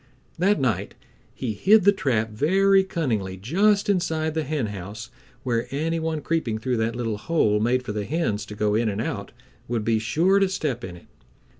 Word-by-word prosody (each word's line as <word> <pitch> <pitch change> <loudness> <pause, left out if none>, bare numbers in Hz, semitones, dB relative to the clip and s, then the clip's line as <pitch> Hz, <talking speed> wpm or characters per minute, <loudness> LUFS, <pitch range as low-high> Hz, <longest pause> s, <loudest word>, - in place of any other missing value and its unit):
That 195 +2 +3
night 130 -5 -1 0.4
he 120 -5 -3
hid 205 - +4
the 200 - +7
trap 115 - 0
very 190 - +3
cunningly 115 - -2
just 195 - +2
inside 160 -5 0
the 160 - 0
henhouse 110 - -4 0.3
where 120 -2 -1
any 160 +4 -1
one 160 -1 -2
creeping 150 -11 -1
through 125 +2 -1
that 110 +1 -1
little 115 -3 -2
hole 110 -8 +1
made 125 +4 +1
for 115 - -5
the 105 -1 -3
hens 125 -7 -1
to 105 - -8
go 105 0 0
in 110 +1 +1
and 100 0 -3
out 100 -3 -4 0.4
would 115 -3 -2
be 115 0 +2
sure 170 - +2
to 195 -1 +2
step 140 -10 -2
in 90 -4 -6
it. 85 - -15
125 Hz, 185 wpm, -24 LUFS, 110-165 Hz, 0.4 s, the